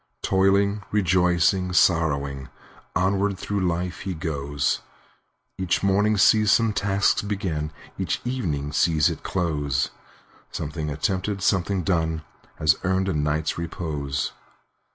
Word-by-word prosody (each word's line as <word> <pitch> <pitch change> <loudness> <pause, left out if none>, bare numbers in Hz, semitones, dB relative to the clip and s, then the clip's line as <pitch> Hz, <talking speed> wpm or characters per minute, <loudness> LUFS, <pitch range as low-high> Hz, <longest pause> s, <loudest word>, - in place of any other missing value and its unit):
Toiling,—rejoicing,—sorrowing, 90 -7 +2 0.5
Onward 100 +1 +1
through 100 +2 -2
life 85 +1 -2
he 95 -2 -4
goes; 70 -4 -1 0.8
Each 95 0 0
morning 100 +2 +3
sees 105 +1 +5
some 115 -2 +3
task 100 0 +1
begin, 85 -7 -2 0.3
Each - - -1
evening 80 - -2
sees 80 0 +3
it - - -7
close; 75 -7 -1 0.6
Something 75 0 -4
attempted, 95 +6 -2
something 95 0 +1
done. 80 -4 0 0.3
Has 75 0 +3
earned 95 0 +1
a - - 0
night's 75 +1 -1
repose. 75 -4 -3
90 Hz, 105 wpm, -24 LUFS, 75-95 Hz, 0.8 s, sees